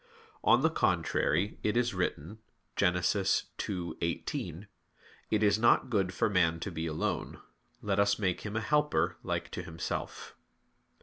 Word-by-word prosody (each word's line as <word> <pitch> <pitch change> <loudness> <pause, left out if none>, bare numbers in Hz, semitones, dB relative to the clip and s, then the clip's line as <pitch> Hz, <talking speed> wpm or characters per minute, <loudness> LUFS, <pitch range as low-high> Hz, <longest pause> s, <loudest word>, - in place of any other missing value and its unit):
On 125 - +5
the 160 - +4
contrary, 90 - +1
It 105 +2 0
is 120 -2 +1
written 90 +2 -3 0.4
(Gen. 90 - +3
2:18): 90 - -2 0.6
"It 110 0 +2
is 105 0 +4
not 120 +2 +4
good 95 -4 +1
for 95 - +1
man 85 -5 +2
to 100 - -4
be 80 0 -3
alone; 80 -1 -2 0.4
let - - 0
us 100 0 +3
make 95 -4 -1
him 105 0 -5
a 110 - 0
helper 105 - +1
like - - -3
to - - -4
himself." 80 +1 -5
100 Hz, 140 wpm, -31 LUFS, 85-110 Hz, 0.6 s, On